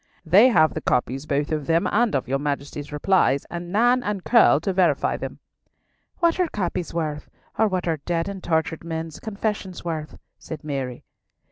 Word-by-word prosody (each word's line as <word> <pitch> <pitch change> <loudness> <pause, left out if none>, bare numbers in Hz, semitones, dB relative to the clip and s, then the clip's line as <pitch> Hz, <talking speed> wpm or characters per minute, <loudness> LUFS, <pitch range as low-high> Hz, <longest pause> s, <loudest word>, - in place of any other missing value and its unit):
"They 195 +9 +7
have 155 -9 +4
the 155 - -4
copies 135 +3 -1
both 145 +1 0
of 150 -3 -2
them 165 +1 +2
and 230 -3 +2
of 135 - -1
your 135 +2 0
Majesty's 145 0 -4
replies, 150 -3 +2
and 175 0 -6
Nan 245 +5 +3
and 205 -5 -3
Curll 230 - +5
to 190 +3 -1
verify 175 -6 +2
them." - - -6 0.8
"What 340 +1 +2
are 360 - +3
copies 180 - -3
worth, 155 -3 -3 0.3
or 220 - +5
what 185 -3 -2
are 165 -1 +1
dead 165 +3 -2
and 195 -2 -6
tortured 160 -1 -1
men's 160 -2 -5
confessions 205 -4 -4
worth?" 155 -2 -4 0.2
said 160 - -8
Mary. 135 -4 -4
165 Hz, 175 wpm, -23 LUFS, 150-195 Hz, 0.8 s, They